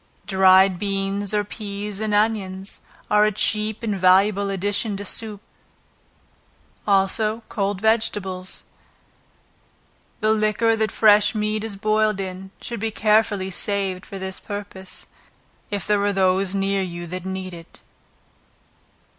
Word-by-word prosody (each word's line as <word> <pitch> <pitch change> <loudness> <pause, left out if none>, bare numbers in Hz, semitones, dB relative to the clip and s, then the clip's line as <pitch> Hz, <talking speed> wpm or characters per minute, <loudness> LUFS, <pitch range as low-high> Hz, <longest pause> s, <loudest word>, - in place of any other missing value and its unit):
Dried 190 -1 +5
beans 195 0 -2
or 210 -1 +1
peas, 205 -1 -6
and 215 -1 -2
onions, 205 -3 -1 0.3
are 210 0 +5
a - - +1
cheap 215 +2 -1
and 215 -3 -1
valuable 195 +2 +4
addition 200 +2 -1
to 205 - -6
soup; 215 0 -3 1.5
also 210 +3 +2
cold 200 -2 -1
vegetables. 200 -4 0 1.6
The 215 - +2
liquor 220 +1 +2
that 220 -1 0
fresh 210 0 +5
meat 215 0 -1
is 220 -2 -4
boiled 215 0 +1
in, 190 0 -5
should 235 -2 -6
be 225 +2 -1
carefully 210 -3 +2
saved 195 -1 -1
for 195 - -7
that 190 0 -6
purpose, 205 -2 -7 0.6
if 205 -3 -3
there 205 -1 +2
are 205 - +2
those 190 0 +2
near 195 0 +1
you 175 -2 -5
that 180 +1 -6
need 190 -1 -5
it. 165 -1 -13
200 Hz, 130 wpm, -22 LUFS, 190-215 Hz, 1.6 s, Dried